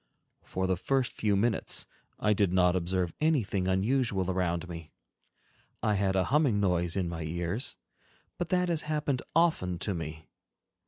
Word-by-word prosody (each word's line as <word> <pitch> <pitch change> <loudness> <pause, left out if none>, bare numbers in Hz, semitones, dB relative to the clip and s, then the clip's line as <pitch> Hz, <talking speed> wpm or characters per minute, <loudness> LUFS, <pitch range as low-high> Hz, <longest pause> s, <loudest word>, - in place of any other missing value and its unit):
For 95 - -3
the 95 -1 +1
first 130 +6 0
few 105 -2 +1
minutes, 110 +1 +1 0.3
I 105 - +3
did 100 -3 +2
not 90 -1 +4
observe 90 0 -1
anything 110 - +1
unusual 95 -1 +1
around 90 -2 -1
me; 80 -3 -9 0.9
I 105 - +3
had 95 -1 +1
a 95 - +3
humming 140 -9 +3
noise 90 -3 +1
in 95 -3 0
my 85 -1 -4
ears, 85 - -2 0.6
but 175 - -2
that 180 -1 +2
has 165 -3 +1
happened 150 -4 0
often 155 - +2
to 95 +3 -2
me. 80 -2 -6
95 Hz, 155 wpm, -30 LUFS, 90-120 Hz, 0.9 s, not